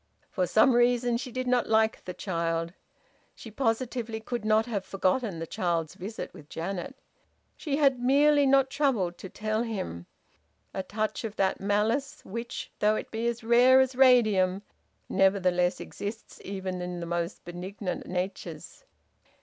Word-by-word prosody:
For 185 -2 0
some 220 +8 +5
reason 240 0 +3
she 250 +1 -6
did 255 +1 -3
not 250 -1 +1
like 220 0 +2
the 180 - -5
child. 165 -2 -2 0.6
She 225 - -11
positively 230 -1 -1
could 235 0 -4
not 215 +1 +3
have 210 -5 -3
forgotten 195 +1 0
the 165 - -4
child's 165 -2 -1
visit 205 +5 -7
with 150 -5 -14
Janet. 195 +10 -4 0.6
She 290 -4 -2
had 275 -4 +3
merely 285 +3 +4
not 270 0 +4
troubled 210 - 0
to 190 - -8
tell 215 +2 -2
him: 190 - -4 0.7
a 190 - -2
touch 215 +5 -3
of 220 -2 -5
that 190 -1 0
malice 215 +7 0
which, 235 +4 -6
though 210 +1 +3
it - - -5
be 225 +1 -2
as 235 0 -2
rare 245 +3 +6
as 260 -1 +2
radium, 215 -7 +4 0.4
nevertheless 185 -2 +2
exists 210 +2 -7
even 190 -2 -4
in 180 0 -4
the 170 - -4
most 170 +1 -3
benignant 180 +2 -5
natures. 180 -3 -5
215 Hz, 150 wpm, -28 LUFS, 185-245 Hz, 0.7 s, rare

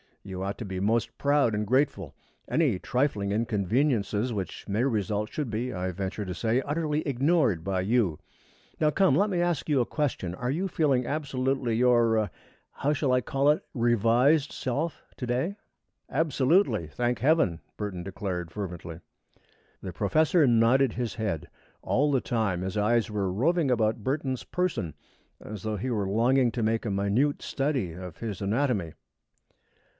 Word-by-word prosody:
You 95 -2 -6
ought 100 +2 -3
to 115 - -4
be 95 -2 -4
most 110 +4 0
proud 140 -5 +3
and 105 +1 -1
grateful. 115 - 0 0.3
Any 140 - +1
trifling 115 -6 0
inconveniences 110 - 0
which 95 -3 -5
may 105 +4 0
result 105 -4 -1
should 150 -5 -3
be, 115 +3 -2
I 90 0 -2
venture 95 +3 -4
to 90 - -4
say, 115 +6 +1
utterly 150 +1 -1
ignored 135 - +2
by 95 0 -1
you. 100 -5 +1 0.6
Now 155 - +4
come, 190 +3 +3
let 205 +2 +3
me 180 -3 0
ask 175 -3 -1
you 145 -3 +3
a 120 - +2
question. 130 - -2
Are 125 +5 -2
you 180 +7 -1
feeling 140 -8 +1
absolutely 135 -4 -1
your 115 -3 +3 0.4
how 145 +2 0
shall 140 -2 0
I 125 0 +3
call 135 +4 +1
it 150 - +2
revised 120 +5 +3
self 145 +6 -3
to 125 - -4
day?" 130 +11 -1 0.5
"Absolutely, 135 - +2
thank 120 +9 -1
Heaven!" 130 - +2 0.2
Burton 100 -4 -4
declared, 90 -3 -4
fervently. 85 -4 -6 0.8
The 95 - -6
professor 155 - +3
nodded 120 +2 +4
his 120 -2 -3
head. 105 -8 -3 0.4
All 145 +3 +2
the 135 -3 +2
time 110 -7 -1
his 95 +3 -3
eyes 115 +2 +2
were 100 -3 -1
roving 150 - +1
about 110 -2 +1
Burton's 130 -1 -2
person, 150 - -2 0.4
as 105 -2 -8
though 110 -1 -2
he 130 +7 -3
were 105 -4 0
longing 120 +5 +3
to 120 - -1
make 110 +1 0
a 105 - -1
minute 100 +9 +1
study 135 - -1
of 90 -1 -8
his 105 -5 -5
anatomy. 100 - 0
115 Hz, 160 wpm, -27 LUFS, 100-140 Hz, 0.8 s, Now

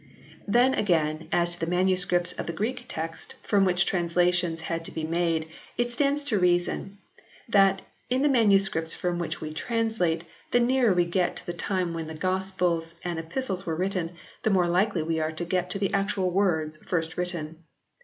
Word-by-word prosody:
Then 245 +5 +4
again 160 - +1
as 175 0 +2
to 165 -1 -3
the - - -2
MSS. 180 -1 +3
of - - -6
the 170 - -2
Greek 240 +7 -3
Text 165 +1 -6
from 200 -2 +3
which 180 0 +3
translations 175 -1 +1
had 165 0 -3
to - - -2
be 160 - -4
made. 165 -1 0 0.3
It 240 0 0
stands 285 +3 +1
to 240 -8 0
reason 180 +2 +1 0.5
that, 195 -3 +4 0.3
in 255 +2 +1
the - - +5
manuscripts 195 - +3
from 175 -1 -2
which 170 - -3
we 155 0 -5
translate, 220 -5 0 0.3
the 245 - +3
nearer 245 -1 +3
we 175 -1 +3
get 175 +1 0
to - - -8
the 175 - -3
time 180 0 -1
when 165 -1 -4
Gospels 180 -2 -1
and 175 -2 -3
Epistles 190 +2 -3
were 165 - -1
written, 180 -1 -2 0.3
the - - +1
more 185 -4 +3
likely 180 0 +1
we 160 0 -1
are 155 0 -1
to 170 +2 -3
get 180 +1 -1
the 195 +1 -1
actual 195 -2 0
words 160 -5 +1
first 165 -1 -2
written. 170 -2 -4
180 Hz, 180 wpm, -27 LUFS, 165-200 Hz, 0.5 s, the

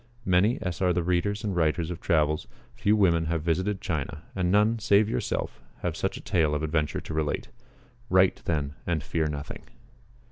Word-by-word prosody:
Many 95 +6 +3
as 90 -3 -3
are 90 -1 +3
the 85 0 0
readers 90 +4 0
and 100 -4 -2
writers 80 0 +1
of 85 - -6
travels, 75 -2 +1 0.3
few 100 - +2
women 85 -6 +3
have 80 -1 -1
visited 95 +5 0
China, 75 -4 -3
and 90 -2 +1
none, 105 +3 +3
save 105 -1 +4
yourself, 110 - -2 0.2
have - - -1
such - - -2
a - - -9
tale 80 -4 +1
of 75 - -2
adventure 75 -1 0
to - - -7
relate. 75 -1 -2 0.6
Write, 95 0 +4
then, 75 -4 -1
and 85 -4 0
fear 80 -2 -1
nothing." 70 -2 -5
85 Hz, 180 wpm, -27 LUFS, 80-95 Hz, 0.6 s, save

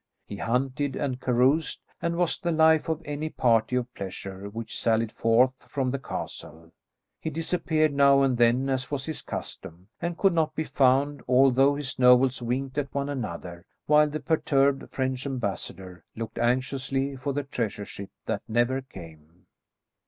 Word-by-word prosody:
He 100 - -7
hunted 130 +5 -1
and 130 -3 -2
caroused, 130 +6 +2 0.2
and 170 0 -1
was 175 -2 +1
the 175 -2 -1
life 160 0 +4
of 160 +1 -2
any 150 +2 -3
party 115 -3 +2
of 125 0 -2
pleasure 95 +1 -7
which 115 +2 -6
sallied 115 -1 +1
forth 120 +4 +3 0.2
from 130 -2 -1
the 140 - -2
castle. 80 - -6 0.5
He - - -3
disappeared 160 -1 0
now 140 0 +5
and 135 -2 +2
then, 120 +3 +3
as 130 -1 -1
was 140 -2 -3
his 160 - -5
custom, 90 +4 -7
and 170 0 -3
could 195 -2 +3
not 155 -2 0
be 160 - -1
found, 140 0 +2
although 135 +2 +5
his 140 -3 -5
nobles 125 0 +5
winked 130 +3 -2
at 140 -1 -4
one 140 0 -1
another, 85 -9 -6 0.2
while 150 0 +5
the 155 +1 -4
perturbed 140 -4 +1
French 130 0 -2
ambassador 95 - -5
looked 115 0 -6
anxiously 135 +3 0
for 135 +2 -3
the 145 +1 -2
treasure 115 -6 -3
ship 100 0 -8 0.2
that - - -2
never 120 +4 +1
came. 85 -7 -14
130 Hz, 160 wpm, -26 LUFS, 115-145 Hz, 0.5 s, now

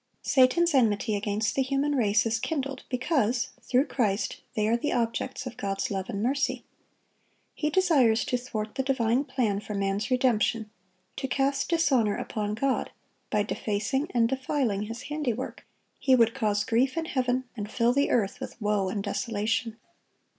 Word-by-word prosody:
Satan's 290 +6 +4
enmity 220 -4 +2
against 205 +1 -1
the 270 - +1
human 275 +2 0
race 210 -5 +3
is 225 0 0
kindled, 275 -1 -3
because, 250 -2 +1
through 255 +3 +2
Christ, 215 -7 -1
they 215 -1 +1
are 225 - +3
the 240 +5 -1
objects 240 +2 -1
of 240 -2 -7
God's 195 0 -2
love 190 -1 -3
and 200 +1 -2
mercy. 275 +3 0 0.9
He 300 - -1
desires 290 -11 +3
to - - 0
thwart 215 -3 -5
the 265 - -1
divine 260 0 +1
plan 240 -7 0
for 210 0 -6
man's 200 +2 -1
redemption, 230 -4 +1 0.5
to 270 - -2
cast 275 +1 0
dishonor 270 -11 +2
upon 210 -1 -3
God, 265 +3 0 0.4
by 210 -1 +2
defacing 220 +8 -2
and 235 -2 +2
defiling 255 -5 -1
His 230 +2 -7
handiwork; 270 -5 -4 0.3
he 260 -2 +4
would 230 -2 +4
cause 210 -5 0
grief 250 +7 +1
in 325 - 0
heaven, 255 -3 0
and 210 -2 -5
fill 235 0 +2
the 280 +2 +2
earth 200 -5 +1
with - - -8
woe 205 -3 +1
and 200 +1 -3
desolation. 225 +2 -1
240 Hz, 160 wpm, -27 LUFS, 210-265 Hz, 0.9 s, Satan's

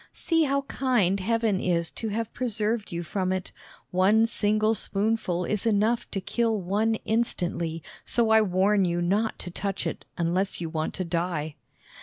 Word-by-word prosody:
See 325 -2 +1
how 280 0 +1
kind 240 -9 +1
Heaven 225 0 +1
is 170 -2 0
to 225 - -5
have 225 +1 -3
preserved 225 -2 -1
you 170 0 -3
from 185 +2 -1
it. 185 -1 -3 0.4
One 200 +5 +4
single 215 -1 +1
spoonful 200 -4 -1
is 210 +4 -1
enough 220 +2 +2
to 195 - -2
kill 225 +3 0
one 210 +5 +1
instantly, 175 -7 -1 0.2
so 230 -2 +1
I 220 0 +7
warn 195 +1 +3
you 175 -1 0
not 200 +6 +1
to 175 - -7
touch 195 +2 -3
it - - -4
unless 180 +3 0
you 170 -2 -3
want 160 -1 -2
to 185 - -2
die." 165 -3 -2
200 Hz, 165 wpm, -26 LUFS, 180-225 Hz, 0.4 s, I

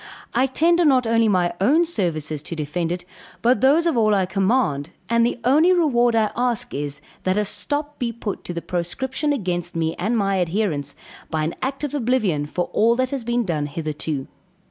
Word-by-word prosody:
I 255 +3 +3
tender 340 +6 +3
not 265 -5 +4
only 230 0 +3
my 180 -4 +2
own 305 - +4
services 155 - -2
to 165 - -6
defend 165 +2 -2
it, 175 0 -4 0.4
but 245 +2 +3
those 290 +6 +4
of 335 -5 +2
all 215 -3 +3
I 190 -2 +2
command; 190 - 0 0.2
and 235 0 +4
the 240 +1 0
only 300 +9 +5
reward 245 -9 +3
I 220 -2 +2
ask, 245 -2 -1
is, 145 0 -4 0.2
that 185 +1 0
a 210 - +2
stop 290 +7 -3
be 240 -2 -1
put 225 -3 -5
to 175 - -4
the 170 - -4
proscription 260 - -2
against 180 -10 -2
me 165 -1 0
and 220 +7 0
my 195 -2 +1
adherents, 165 -6 -1 0.3
by 155 -1 -1
an 160 - -1
act 270 +2 -3
of 295 - -2
oblivion 225 - 0
for 175 +3 -2
all 230 +2 +4
that 255 +1 0
has 275 -4 -3
been 240 0 0
done 155 -5 -1
hitherto. 150 -2 -4
215 Hz, 195 wpm, -22 LUFS, 170-255 Hz, 0.4 s, only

